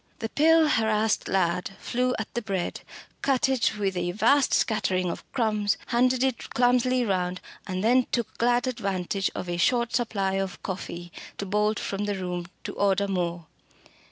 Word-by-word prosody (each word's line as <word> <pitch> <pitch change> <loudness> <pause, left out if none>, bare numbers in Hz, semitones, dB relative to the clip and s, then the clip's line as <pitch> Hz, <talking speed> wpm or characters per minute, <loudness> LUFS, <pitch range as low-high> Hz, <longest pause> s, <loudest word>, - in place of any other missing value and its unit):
The 225 - -4
pale, 320 +3 +4
harassed 220 -3 +1
lad 180 +1 0
flew 250 +1 0
at 220 - -5
the 240 - -1
bread, 195 -5 -3 0.4
cut 270 -2 +2
it 255 -5 +1
with 195 -2 -1
a 175 0 -1
vast 275 +7 +3
scattering 185 -5 +1
of - - -7
crumbs, 215 -5 +1
handed 255 +1 +2
it 260 -3 -1
clumsily 250 0 +3
round, 180 -3 -1 0.3
and 185 0 -3
then 245 +2 +4
took 235 -3 -2
glad 240 +1 +3
advantage 195 -6 -1
of 180 - -4
a 175 0 -2
short 235 +6 +2
supply 200 -5 0
of 190 -2 -6
coffee 175 -2 -6 0.3
to 200 - -3
bolt 210 +2 +1
from 200 +1 -3
the 205 -1 -1
room 180 -2 -4 0.2
to - - -5
order 200 0 +1
more. 175 -3 -2
210 Hz, 165 wpm, -26 LUFS, 185-240 Hz, 0.4 s, pale